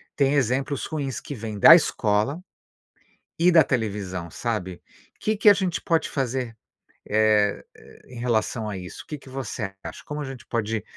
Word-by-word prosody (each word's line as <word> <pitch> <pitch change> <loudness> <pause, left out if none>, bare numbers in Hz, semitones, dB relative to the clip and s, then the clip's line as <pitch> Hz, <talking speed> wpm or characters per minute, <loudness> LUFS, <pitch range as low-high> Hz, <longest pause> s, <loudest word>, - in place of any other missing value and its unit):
têm 140 -1 +2
exemplos 135 +1 0
ruins 140 -4 -3
que - - -7
vêm 110 -2 -6
da 130 - +10
escola 130 - 0 1.0
e 175 +2 +5
da 165 -2 +7
televisão, 100 -9 -3
sabe, 95 -7 -4 0.4
que 215 - 0
que 210 - +6
a - - +9
gente 185 -3 -2
pode 165 -4 0
fazer, 130 -3 -2 0.5
eh 105 -1 +2
eh, - - -17
em 125 -2 -10
relação 115 -2 -1
a 100 - -4
isso? 90 -1 -9
O - - -34
que 150 - -5
que 135 - -15
você 120 -6 -5
acha? - - -8
Como 150 0 -5
a - - -4
gente 135 -3 -9
pode 110 -2 -2
125 Hz, 175 wpm, -24 LUFS, 105-145 Hz, 1.0 s, da